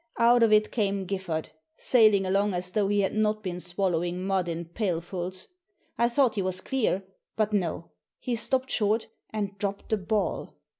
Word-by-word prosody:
Out 235 +1 +5
of 225 -2 +5
it 215 0 +4
came 200 -4 0
Giffard, 180 -4 -3 0.3
sailing 215 -5 +4
along 195 +1 +1
as 180 +1 -2
though 205 0 +1
he 205 0 +2
had 195 - 0
not 215 0 +1
been 180 -2 -4
swallowing 175 0 -1
mud 190 -2 0
in 170 0 -3
pailfuls. 180 0 -3 0.5
I 235 0 +2
thought 250 -1 +3
he 205 - -1
was 185 0 -1
clear 230 -7 0 0.2
— - - -54
^but 215 -1 +1
no! 170 -4 -1 0.3
He 245 - -2
stopped 260 +3 0
short, 215 +1 +1 0.2
and 205 -2 -3
dropped 200 0 -3
the 220 - +2
ball! 210 +2 -2
200 Hz, 180 wpm, -27 LUFS, 185-215 Hz, 0.5 s, Out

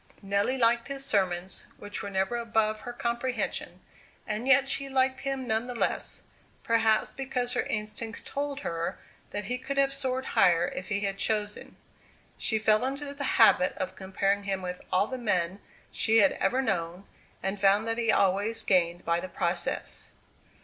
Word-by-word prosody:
Nelly 200 +6 +1
liked 235 -1 +3
his 275 0 -1
sermons, 185 -4 0
which 205 0 -4
were - - -5
never 190 +4 0
above 220 -2 0
her 245 - -6
comprehension; 240 +1 -2 0.4
and 215 +4 -3
yet 270 0 +6
she 275 0 -1
liked 260 0 +2
him 270 -1 -3
none 225 +1 0
the 245 - -5
less, - - -1 0.4
perhaps, 225 -2 +2
because 250 -2 -2
her 245 - +1
instincts 220 +1 -4
told 285 0 -3
her 165 -6 -3 0.3
that 205 - -4
he 250 +1 -2
could 270 +2 -5
have 275 0 +3
soared 260 -1 -2
higher 175 -1 +4
if 185 - -6
he 205 -1 0
had 195 -1 -2
chosen. 210 -1 -1 0.6
She 220 - +1
fell 215 +1 +3
into 280 +2 -3
the 285 0 -5
habit 220 -8 +5
of 185 - -3
comparing 195 +1 -1
him 195 -1 -2
with 180 0 -5
all 185 +2 +3
the 260 +3 -5
men 185 -4 0 0.3
she 220 +1 +2
had 200 -3 +6
ever 250 +7 0
known, 180 -3 -2 0.4
and 195 +1 -2
found 200 +3 +4
that 225 +1 -1
he 230 -2 +3
always 200 +4 +2
gained 175 -2 +2
by 170 +1 +2
the 185 +1 -6
process. 175 0 -2
220 Hz, 170 wpm, -28 LUFS, 195-255 Hz, 0.6 s, yet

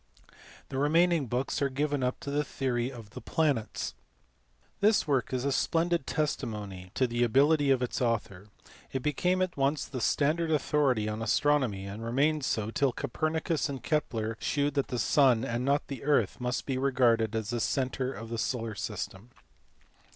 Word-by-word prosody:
The 135 - -3
remaining 165 0 +3
books 125 +5 -2
are 140 - +2
given 145 +1 -1
up 125 0 -1
to 140 - -5
the 145 +1 +1
theory 130 -2 -2
of 115 -5 -11
the - - -8
planets. 145 -9 -1 0.9
This 210 -3 +3
work 135 -4 +1
is 130 0 -1
a 140 - +1
splendid 165 +2 +1
testimony 105 - -3
to 130 - +3
the 120 0 -2
ability 140 +5 +4
of 130 -2 +3
its 125 - -3
author. 110 -5 -1 0.4
It 130 -1 -3
became 180 +5 +1
at 185 - -3
once 140 +1 +1
the 130 -3 -6
standard 155 +7 +1
authority 140 -7 +2
on 110 +1 -3
as 115 - +2
tronomy, 130 -10 +1
and 105 +3 -7
remained 140 +6 +1
so 110 -4 -1
till 140 +2 +2
Copernicus 155 +4 -1
and 135 -2 -5
Kepler 115 -8 -1
shewed 145 -1 0
that 140 -2 0
the 125 - -3
sun 125 0 +3
and 120 -1 -2
not 140 +2 +1
the 135 -5 -6
earth 145 -2 +1
must 125 0 -2
be 130 -2 -1
regarded 120 -5 +2
as 110 0 -2
the 120 - -1
centre 130 +1 -1
of 115 -3 -8
the 115 -1 -3
solar 115 -3 -2
system. 100 +1 -5
130 Hz, 175 wpm, -29 LUFS, 115-145 Hz, 0.9 s, ability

